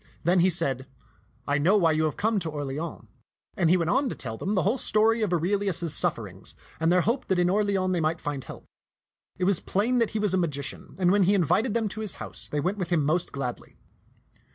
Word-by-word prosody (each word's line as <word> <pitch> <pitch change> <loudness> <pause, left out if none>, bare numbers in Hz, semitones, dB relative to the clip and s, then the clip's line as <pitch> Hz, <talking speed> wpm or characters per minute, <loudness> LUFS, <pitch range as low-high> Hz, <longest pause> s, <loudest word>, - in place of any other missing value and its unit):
Then 180 +3 +3
he 180 +2 +4
said, 135 -6 -1 0.3
" 105 +6 -36
I 145 +1 +1
know 185 +8 +4
why 165 -5 +3
you 155 0 +1
have 155 - -2
come 220 -1 +1
to 165 -3 -3
Orleans 145 +2 -5 0.3
"; - - -47
and 175 -6 +2
he 180 - +5
went 170 -1 0
on 265 +1 +2
to - - -4
tell 110 -4 -4
them 195 - -2
the 185 - +2
whole 225 +7 +1
story 225 +2 +3
of 210 -4 0
Aurelius's 180 -1 0
sufferings - - -1 0.2
and 165 +1 +2
their 180 0 +4
hope 240 +8 -1
that 190 - +1
in 180 0 +2
Orleans 195 -2 +1
they 175 - 0
might 160 +1 0
find 145 -3 -4
help. - - -11 0.7
It 185 - -3
was 185 -2 +3
plain 235 +6 0
that 230 - +2
he 220 - -3
was 210 -3 +1
a 190 - +2
magician, 145 -5 -4
and 180 -1 +3
when 200 -1 +4
he 200 +3 +3
invited 200 - +1
them 225 -2 +1
to 215 +3 -6
his 215 -3 -2
house, - - -7
they 150 - -1
went 185 +8 -1
with 180 -3 -3
him 165 -5 +1
most 160 +4 0
gladly. 125 -3 -6
180 Hz, 240 wpm, -26 LUFS, 155-205 Hz, 0.7 s, he